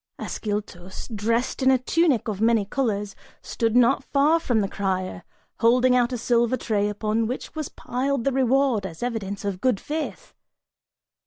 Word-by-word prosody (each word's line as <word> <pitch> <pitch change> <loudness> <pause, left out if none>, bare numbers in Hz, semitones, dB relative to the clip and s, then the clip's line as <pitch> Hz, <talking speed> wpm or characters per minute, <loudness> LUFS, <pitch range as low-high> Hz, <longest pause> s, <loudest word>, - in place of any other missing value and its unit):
Ascyltos, 205 -4 -5
dressed 230 +6 -1
in 260 - +4
a 265 - +5
tunic 275 -1 +1
of 210 -2 -3
many 225 -2 +3
colors, 205 -3 -2 0.3
stood 230 -1 -1
not 245 +2 +4
far 295 +5 +3
from 240 -9 +1
the 200 - 0
crier, 185 -2 -3 0.4
holding 250 +2 +4
out 245 0 +2
a 250 - -2
silver 240 +1 +1
tray 210 -4 0
upon 215 +2 -1
which 250 +3 -5
was 310 -3 -4
piled 260 +1 -2
the 275 - +1
reward, 260 -3 +2
as 170 +1 -7
evidence 205 -5 -3
of 195 -2 -3
good 250 -6 +2
faith. 320 +11 -5
235 Hz, 160 wpm, -24 LUFS, 205-260 Hz, 0.4 s, a